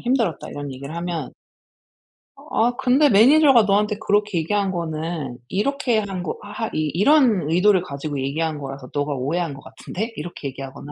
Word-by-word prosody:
힘들었다." 240 -8 0
이런 145 -1 -6
얘기를 140 +4 -8
하면 170 -4 -4 1.1
"아 240 +2 0
근데 265 +3 +4
매니저가 265 +3 +6
너한테 210 +1 +1
그렇게 205 -3 +1
얘기한 195 +4 0
거는 160 -5 -4
이렇게 245 - 0
한 195 -3 -4
거 175 - -4
하 210 +2 -4
하 - - -7
이 155 -1 -1
이런 210 - +4
의도를 185 +3 +4
가지고 145 -3 -5
얘기한 155 +3 -2
거라서 135 -2 -8
너가 145 0 -1
오해한 145 +4 -2
것 135 - -11
같은데?" 225 +5 -6
이렇게 155 -2 -6
얘기하거나 135 +2 -9
175 Hz, 375 characters per minute, -22 LUFS, 145-210 Hz, 1.1 s, 매니저가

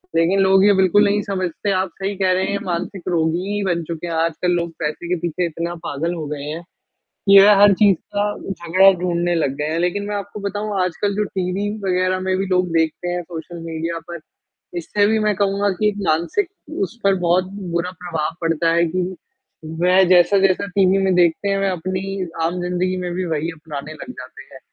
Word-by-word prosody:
लेकिन 175 +4 +3
लोग 190 0 +5
ये 205 - +6
बिल्कुल 190 +2 +4
नहीं 205 +1 +2
समझते 190 0 -2
आप 190 0 0
सही 195 +1 -2
कह 190 -1 +2
रहे 185 +1 +1
हैं 200 - -1
मानसिक 180 +1 -4
रोगी 165 -1 +1 0.2
ही 205 - -1
बन 170 -2 0
चुके 165 +1 -6
हैं 170 - -3
आजकल 165 +2 0
लोग 170 -1 -1
पैसे 155 +2 -3
के 180 - +2
पीछे 175 +1 -1
इतना 170 +1 -4
पागल 165 +4 -2
हो 160 -2 -5
गए 145 -1 -5
हैं, 155 +4 -5 0.7
ये 195 0 +9
हर 205 0 +8
चीज़ 200 -1 +4 0.2
का 205 0 +1 0.2
झगड़ा 185 +1 +4
ढूँढने 175 -1 0
लग 145 -5 0
गए 150 +1 -1
हैं 165 - -1
लेकिन 180 +3 -1
मैं 210 - -2
आपको 200 +1 -6
बताऊँ 205 0 -3
आजकल 190 +3 -2
जो 210 - +1
टीवी 190 +2 -1 0.2
वग़ैरह 185 0 +1
में 185 0 0
भी 195 - -1
लोग 180 -1 +1
देखते 160 +2 -1
हैं 175 0 -2
सोशल 170 0 -8
मीडिया 165 +1 -3
पर, 170 -1 -6 0.6
इससे 205 +4 +1
भी 220 +1 +2
मैं 210 -1 +1
कहूँगा 200 +1 +1
कि 210 - +3
एक 205 - -1
मानसिक 170 - +1 0.3
उस 240 -11 -4
पर 195 0 +4
बहुत 180 +2 +3 0.3
बुरा 175 +1 -1
प्रभाव 165 -3 -3
पड़ता 165 0 +1
है 170 0 +3
कि 185 0 -1 0.7
वह 180 +2 +5
जैसा-जैसा 185 +2 +4
टीवी 195 0 +3
में 190 -1 +2
देखते 175 +2 +2
हैं, 195 0 +1
वह 195 0 +1
अपनी 185 +2 -3 0.2
आम 175 +2 -1
ज़िंदगी 180 +1 -1
में 180 -1 -3
भी 185 +1 -2
वही 160 0 -2
अपनाने 155 -2 -8
लग 205 - -9
जाते - - -10
हैं, - - -10
180 Hz, 205 wpm, -20 LUFS, 170-195 Hz, 0.7 s, ये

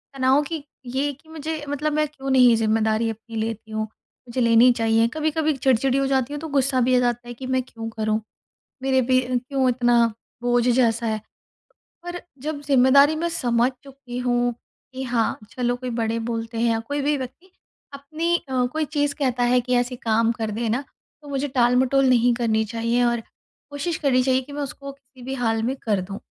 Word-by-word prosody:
तनाव 265 +2 +3
कि 315 -1 -5 0.2
ये 270 +4 -1
कि 315 +4 -21
मुझे, 315 -1 -5
मतलब, 295 +1 -1
मैं 305 0 +1
क्यों 270 -2 -7
नहीं 250 -3 +6
ज़िम्मेदारी 220 0 +1
अपनी 225 +1 -8
लेती 220 0 -4
हूँ, 215 0 -1
मुझे 235 +3 -8
लेनी 235 +2 +6
चाहिए। 225 0 +2
कभी-कभी 310 0 0
चिड़चिड़ी 265 +1 +2
हो 275 - +1
जाती 265 +1 0
हूँ, 295 - -4
तो 320 - -5
गुस्सा 270 -2 +1
भी 255 +1 +3
आ - - +5
जाता 240 -1 -1
है 240 - -6
कि 255 +2 -9
मैं 260 0 +1
क्यों 225 -2 -7
करूँ, 215 0 -1 0.6
मेरे 260 -1 +3
पे 255 - +6 0.2
क्यों 260 +1 -1
इतना 240 -1 +3 0.4
बोझ 245 0 +2
जैसा 235 -2 +2
है। 215 0 -1 0.8
पर 350 0 -6 0.2
जब 300 -1 -4
ज़िम्मेदारी 280 +2 +5
मैं 340 +2 -1
समझ 245 -5 +1
चुकी 265 -3 -9
हूँ 245 -1 +1 0.4
कि 260 +1 -5
हाँ, 240 -3 0
चलो, 245 -1 -1
कोई 250 0 -5
बड़े 230 -1 -1
बोलते 230 0 -4
हैं 235 0 +2
या 225 - 0
कोई 285 +5 -3
भी 295 +1 +1
व्यक्ति 270 +9 -8 0.4
अपनी 315 +5 -1
अ, 255 -1 +1
कोई 315 -1 0
चीज़ 290 -1 0
कहता 250 -4 0
है 250 +1 +4
कि 250 +1 -2
ऐसे 245 +1 0
काम 230 0 +1
कर 225 -2 -3
देना, 230 +4 -1 0.4
तो 290 - -14
मुझे 275 +1 -1
टाल-मटोल 255 +1 +3
नहीं 245 -1 +4
करनी 220 -2 +1
चाहिए 230 +2 0
और 235 -1 +1 0.5
कोशिश 295 +4 -3
करनी 260 -3 +2
चाहिए 260 0 +2
कि 280 +3 -13
मैं 290 - -4
उसको 280 0 -6
किसी 265 -2 -20
भी 265 - -4
हाल 225 -3 0
में 260 +3 -1
कर 205 -4 +1
दूँ। 195 +2 -7
250 Hz, 195 wpm, -23 LUFS, 230-280 Hz, 0.8 s, नहीं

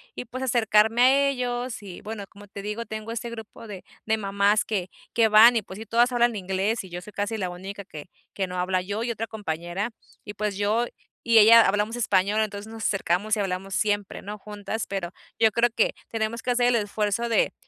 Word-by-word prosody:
y, - - -5
pues, 255 +2 -7
acercarme 225 -2 +3
a 275 +2 +5
ellos 245 -3 -3
y, 185 -3 -9
bueno, 215 -1 -6
como 205 +1 -15
te 200 0 -8
digo, 210 +3 -4
tengo 220 +1 -6
este 235 +1 -4
grupo 225 0 -10
de 195 -3 -8 0.2
de 220 0 +1
mamás 200 0 +2
que 190 -4 -2 0.2
que 230 -1 +4
van 220 +3 +8
y, 225 - +1
pues 190 -1 -11
sí, 220 - -8
todas 240 +3 +3
hablan 240 -1 +3
inglés 195 +3 -1
y 190 - -11
yo 175 0 -6
soy 210 +3 -12
casi 205 +2 -2
la 185 -3 -2
única 195 +3 -7
que 155 -3 -11 0.2
que 190 -2 -2
no 180 - -6
habla, 180 +1 0
yo 205 +4 -3
y 235 - -1
otra 225 0 -4
compañera, 185 +1 -4 0.3
y 205 - -8
pues 210 -1 -3
yo 215 +4 +1 0.4
y 230 -1 +3
ella 225 +1 +8
hablamos 210 +4 0
español. 205 -1 +2
Entonces 210 0 -4
nos 225 0 -7
acercamos 195 +2 +1
y - - -4
hablamos 190 0 -3
siempre, 205 -2 -1
¿no?, 210 +2 -7
juntas, 210 +1 -5
pero 190 -3 -4 0.3
yo 220 -1 +4
creo 235 +3 +3
que - - +2
tenemos 225 +1 -3
que 250 - -1
hacer 245 0 +3
el 245 - +3
esfuerzo 210 +1 -1
de 230 - +2
210 Hz, 215 wpm, -25 LUFS, 195-230 Hz, 0.4 s, van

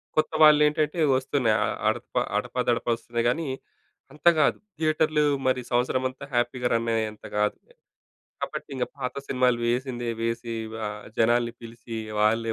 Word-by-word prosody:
కొత్త 155 - +2
వాలేంటంటే 150 +1 +5 0.2
వస్తున్నాయి 130 -4 +1
అ - - +1 0.2
అ - - +4
అడప - - -5 0.2
అడపాదడపా 120 -1 -1
వస్తున్నాయి, 115 0 -3
కానీ, 160 +4 -1 0.7
అంత 150 - -3
గాదు. 155 - +3 0.2
థియేటర్‌లు 155 -1 +2 0.2
మరి 130 -1 +2
సంవత్సరమంతా 130 +2 0
హ్యాపీ‌గా 125 +1 0
రన్ 115 0 0
అయ్యేంత 110 -1 -3
కాదులే. 105 0 -1 0.7
కాబట్టి - - -4
ఇంగా 125 - 0
పాత 125 -1 -3
సినిమాలు 125 -2 +2
వేసిందే 120 0 -1
వేసి 115 0 -2 0.3
ఆహ్, 105 0 -6
జనాల‌ని 120 +1 +3
పిలిచి 115 0 -8 0.2
వాళ్ళే 115 +1 +2
120 Hz, 135 wpm, -26 LUFS, 115-135 Hz, 0.7 s, వాలేంటంటే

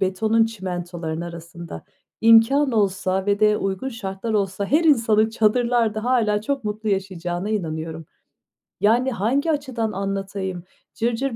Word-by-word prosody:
betonun, 215 +4 +2
çimentolarının 175 -6 -5
arasında. 170 - -8 0.4
İmkân 230 +5 +5
olsa 195 -2 0
ve 205 +1 +1
de 210 0 +4
uygun 195 +6 -2
şartlar 225 -2 -5
olsa 200 -1 -1
her 310 - +2
insanın 225 -7 +4
çadırlarda 225 0 +1
hâlâ 225 -5 +2
çok 275 +2 -3
mutlu 215 +1 -3
yaşayacağına 190 -1 -2
inanıyorum. 160 -5 -4 0.8
Yani, 240 +5 +3
hangi 260 - 0
açıdan 260 -7 -2
anlatayım; 195 -2 -4 0.3
cırcır 240 +2 -1
210 Hz, 120 wpm, -22 LUFS, 190-230 Hz, 0.8 s, İmkân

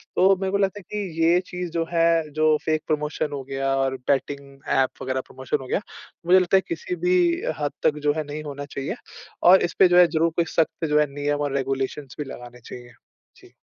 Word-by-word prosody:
तो 190 +1 +5
मेरे 190 0 -1
को 200 - +2
लगता 200 +1 0
है - - -14
कि 175 -6 -3
ये 170 +2 +5
चीज़ 180 -1 -5
जो 165 -1 -1
है 165 -2 +2
जो 155 0 +3
फ़ेक 155 -1 +1
प्रमोशन 150 0 -1
हो 140 -2 -4
गया 135 0 -1
और 135 0 0
बेटिंग 140 0 -2 0.2
ऐप 135 -1 +3
वगैरह 130 0 -2
प्रमोशन 130 -1 -3
हो 130 - -9
गया 200 - 0 0.4
मुझे 185 +2 +6
लगता 185 +1 +3
है - - +3
किसी 170 +2 -4
भी 180 +1 +4 0.4
हद 145 -1 -1
तक 150 - +2
जो 145 - +4
है 155 0 -2
नहीं 150 +1 -6
होना 145 -1 -6
चाहिए 140 - -5 0.5
और 185 +2 +7
इसपे 180 +2 +4
जो 175 0 +3
है 180 -1 +8
ज़रूर 165 +1 +1
कोई 170 - +2
सख्त 165 0 +1
जो 150 0 +2
है 150 - +4
नियम 145 0 -1
और 145 -1 -1
रेगुलेशंस 135 +1 -3
भी - - -1
लगाने 120 0 -10
चाहिए। 120 +1 -11 0.5
जी। - - -19
150 Hz, 220 wpm, -24 LUFS, 135-175 Hz, 0.5 s, है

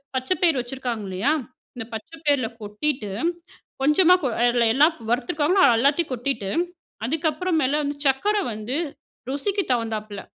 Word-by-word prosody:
பச்சை 260 +8 0
பயிர் 325 -6 +4
வச்சுருக்காங்க 245 -3 -4
இல்லையா, 195 +11 +1 0.4
இந்த 225 -2 -5
பச்சை 220 +9 -8
பயிரில 280 -5 +3
கொட்டிட்டு, 210 +1 -2 0.7
கொஞ்சமா 335 +5 +6 0.3
அதில 240 -1 +3
எல்லாம் 305 +5 +4
வறுத்துருக்காங்கன்னா 295 +9 +2 0.2
எல்லாத்தையும் 285 +5 +2
கொட்டிட்டு, 245 -5 -2 0.6
அதுக்கப்புறம் 320 +4 0
மேல 280 +3 +1
வந்து 285 0 -2
சர்க்கரை 400 +11 +2
வந்து 215 +5 -4 0.5
ருசிக்குத் 385 +7 -1
தகுந்தாப்புல, 215 -4 -2
270 Hz, 120 wpm, -24 LUFS, 235-310 Hz, 0.7 s, கொஞ்சமா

